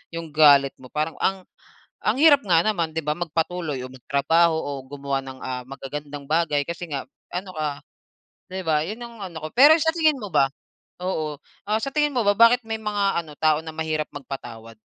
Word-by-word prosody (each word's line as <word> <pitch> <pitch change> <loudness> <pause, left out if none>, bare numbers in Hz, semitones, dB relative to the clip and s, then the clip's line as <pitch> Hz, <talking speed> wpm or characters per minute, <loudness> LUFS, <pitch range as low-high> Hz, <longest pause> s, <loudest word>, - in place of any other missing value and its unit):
yung 165 -2 -6
galit 145 -2 +6
mo. 130 - -12
Parang 155 +4 -3
ang 190 -1 0 0.6
ang - - +2
hirap 290 -3 +7
nga 170 -4 +4
naman 170 -7 0
'di 160 - -1
ba 150 0 -1
magpatuloy 165 -3 -2
o - - -9
magtrabaho 140 +6 +2
o 145 -2 -3
gumawa 140 0 -3
ng, 130 -1 -9
ah, 125 -1 -4
magagandang 140 +2 -7
bagay. 155 -2 +2
Kasi 170 0 -5
nga 135 -2 -3 0.3
ano 185 +2 -4
ka,'di 155 +5 -8
ba, 155 -2 +2
yun 215 +6 -6
ang 235 -1 -10
ano 165 - -8
ko. - - -2
Pero 285 +5 +9
sa 320 - +3
tingin 310 -5 +3
mo 210 - -6
ba, 135 -1 +3 0.5
oo, 155 -5 -2 0.3
ah, 215 +1 +1
sa 275 - -2
tingin 295 -1 +2
mo 245 - +2
ba 205 - +4
bakit 230 +2 +6
may 225 0 -2
mga 200 -4 0
ano, 155 -2 -12
tao 155 -1 +3
na 160 - -5
mahirap 155 -1 -1
magpatawad? 115 -5 -8
160 Hz, 195 wpm, -24 LUFS, 145-195 Hz, 0.6 s, Pero